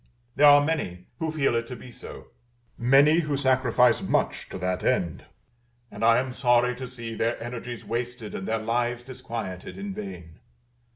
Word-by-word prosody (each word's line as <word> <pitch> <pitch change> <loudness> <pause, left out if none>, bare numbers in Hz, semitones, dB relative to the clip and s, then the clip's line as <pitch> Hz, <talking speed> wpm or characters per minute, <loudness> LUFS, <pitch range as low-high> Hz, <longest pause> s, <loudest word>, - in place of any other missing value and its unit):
There 145 +1 +6
are 145 0 +7
many 90 - -2
who 160 -1 -1
feel 145 -6 +1
it 115 0 -1
to 125 - -6
be 125 - -12
so; - - -11 0.5
many 140 +6 +5
who 150 -4 -1
sacrifice 125 -3 +3
much - - -1
to - - -6
that 90 0 -2
end; 85 -3 0 0.7
and - - -6
I 115 0 +6
am 130 0 -1
sorry 125 0 +3
to 130 - -6
see 120 -2 -7
their 115 +1 -1
energies 120 0 -6
wasted 120 -1 -4
and 95 - -5
their 115 - 0
lives 120 +2 -1
disquieted 115 - -7
in 200 0 -5
vain. 190 - -8
120 Hz, 170 wpm, -26 LUFS, 115-135 Hz, 0.7 s, are